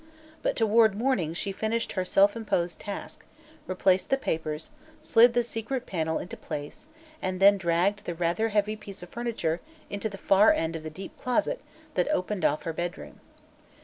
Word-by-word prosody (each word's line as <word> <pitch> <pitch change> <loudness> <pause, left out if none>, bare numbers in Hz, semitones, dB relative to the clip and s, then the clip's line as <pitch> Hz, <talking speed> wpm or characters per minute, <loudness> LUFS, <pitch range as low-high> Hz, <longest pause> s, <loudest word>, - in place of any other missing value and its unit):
But - - 0
toward 220 -2 +4
morning 205 - 0
she 195 - -2
finished 220 +4 -1
her 185 - -1
self 200 +3 +4
imposed 175 -7 -1
task, 200 -1 -7 0.4
replaced 185 0 +2
the 270 - +3
papers, 160 - -3 0.3
slid 235 +1 +5
the 240 - +4
secret 240 +3 -4
panel 160 -3 -1
into - - -6
place 145 - -7 0.3
and 185 0 -2
then 200 +1 +7
dragged 190 +3 +1
the 175 - -3
rather 175 +7 0
heavy 210 0 +1
piece 200 -4 -9
of 175 - -10
furniture 225 -9 -2 0.3
into 205 +2 -2
the 200 - -8
far 195 +2 +5
end 165 0 -1
of 165 - -4
the 155 - -6
deep 185 +5 -9
closet 310 - 0 0.3
that - - +1
opened 205 - -1
off 150 - +2
her 165 - -3
bedroom. 175 +2 -5
195 Hz, 175 wpm, -28 LUFS, 170-225 Hz, 0.4 s, then